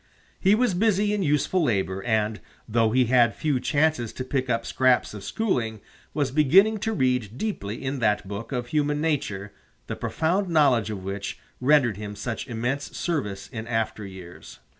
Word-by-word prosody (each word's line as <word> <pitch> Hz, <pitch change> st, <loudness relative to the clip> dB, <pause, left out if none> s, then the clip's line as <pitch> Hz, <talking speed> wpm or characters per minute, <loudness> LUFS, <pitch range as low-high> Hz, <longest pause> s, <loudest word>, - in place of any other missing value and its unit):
He 195 Hz, +2 st, +4 dB
was 245 Hz, -3 st, +2 dB
busy 205 Hz, +1 st, +2 dB
in 210 Hz, -, 0 dB
useful 150 Hz, +3 st, +1 dB
labor, 95 Hz, -7 st, 0 dB
and, 110 Hz, -2 st, 0 dB, 0.3 s
though 115 Hz, 0 st, +2 dB
he 125 Hz, +3 st, +3 dB
had 120 Hz, -1 st, +4 dB
few 145 Hz, -4 st, 0 dB
chances 145 Hz, -5 st, +1 dB
to 130 Hz, -, -5 dB
pick 130 Hz, 0 st, -2 dB
up 115 Hz, -1 st, 0 dB
scraps 130 Hz, -3 st, +2 dB
of 105 Hz, -2 st, -8 dB
schooling, 115 Hz, -, -1 dB, 0.3 s
was 145 Hz, -3 st, -1 dB
beginning 190 Hz, +10 st, +5 dB
to 225 Hz, +2 st, -1 dB
read 125 Hz, -, 0 dB
deeply 135 Hz, -, -4 dB
in 135 Hz, +1 st, -2 dB
that 105 Hz, -4 st, +1 dB
book 105 Hz, +5 st, -6 dB
of 120 Hz, -2 st, -3 dB
human 150 Hz, 0 st, +1 dB
nature, 105 Hz, -11 st, -2 dB, 0.3 s
the -, -, -4 dB
profound 180 Hz, +4 st, -1 dB
knowledge 135 Hz, -9 st, +3 dB
of 100 Hz, -3 st, -5 dB
which 100 Hz, +1 st, -4 dB, 0.2 s
rendered 125 Hz, -6 st, +3 dB
him 105 Hz, -1 st, -6 dB
such 110 Hz, +2 st, -4 dB
immense 125 Hz, +5 st, -3 dB
service 105 Hz, -, -2 dB
in 110 Hz, 0 st, -7 dB
after 115 Hz, -2 st, -1 dB
years. 95 Hz, -3 st, -11 dB
125 Hz, 170 wpm, -25 LUFS, 110-155 Hz, 0.3 s, beginning